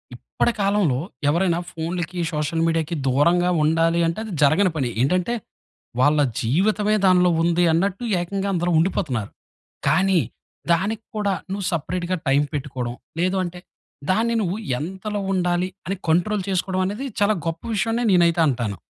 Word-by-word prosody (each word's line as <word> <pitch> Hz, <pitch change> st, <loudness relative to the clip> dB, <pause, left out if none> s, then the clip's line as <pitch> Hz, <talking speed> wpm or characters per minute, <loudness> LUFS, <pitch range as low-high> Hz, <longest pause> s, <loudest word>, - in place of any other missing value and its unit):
ఇప్పటి -, -, -1 dB
కాలంలో, 195 Hz, -10 st, +2 dB, 0.3 s
ఎవరైనా 170 Hz, +1 st, +2 dB
ఫోన్‌లకి 170 Hz, +2 st, -4 dB
సోషల్ 150 Hz, +2 st, -1 dB
మీడియాకి 165 Hz, 0 st, 0 dB
దూరంగా 170 Hz, +7 st, +3 dB
ఉండాలి 165 Hz, +2 st, +2 dB
అంటే, 165 Hz, +6 st, -2 dB
అది 220 Hz, -, -7 dB
జరగని 165 Hz, +6 st, +4 dB
పని. 135 Hz, -5 st, -1 dB
ఏంటంటే, 180 Hz, -, +1 dB, 0.7 s
వాళ్ళ 150 Hz, +3 st, +4 dB, 0.2 s
జీవితమే 205 Hz, -, +2 dB
దానిలో 180 Hz, -1 st, +5 dB
ఉంది 175 Hz, +1 st, +2 dB
అన్నట్టు 195 Hz, +6 st, 0 dB, 0.2 s
ఏకంగా 195 Hz, +2 st, -2 dB
అందరూ 175 Hz, 0 st, 0 dB
ఉండిపోతున్నారు. 135 Hz, -, -1 dB, 0.6 s
కానీ 190 Hz, -2 st, +3 dB, 0.5 s
దానికి 210 Hz, +6 st, -1 dB
కూడా 200 Hz, -2 st, +1 dB, 0.2 s
నువ్వు 195 Hz, -1 st, -3 dB
సెపరేట్‌గా 175 Hz, +3 st, -2 dB
టైమ్ 140 Hz, +2 st, +3 dB
పెట్టుకోవడం. 130 Hz, -4 st, -4 dB, 0.3 s
లేదు 185 Hz, +2 st, +1 dB
అంటే 180 Hz, 0 st, -6 dB, 0.5 s
దాన్ని 230 Hz, +3 st, +1 dB
నువ్వు 190 Hz, +2 st, -1 dB, 0.2 s
ఎంతలో 190 Hz, +6 st, -4 dB
ఉండాలి 180 Hz, 0 st, +1 dB, 0.2 s
అని 195 Hz, -, -1 dB
కంట్రోల్ 190 Hz, +5 st, +2 dB
చేసుకోవడం 185 Hz, 0 st, 0 dB
అనేది 215 Hz, +8 st, -4 dB, 0.2 s
చాలా 210 Hz, +1 st, +4 dB
గొప్ప 165 Hz, 0 st, -3 dB
విషయం 220 Hz, +3 st, 0 dB
అని 240 Hz, -, 0 dB
నేనైతే 170 Hz, -1 st, +4 dB
అంటాను. 115 Hz, -7 st, -2 dB
175 Hz, 140 wpm, -22 LUFS, 160-195 Hz, 0.7 s, దానిలో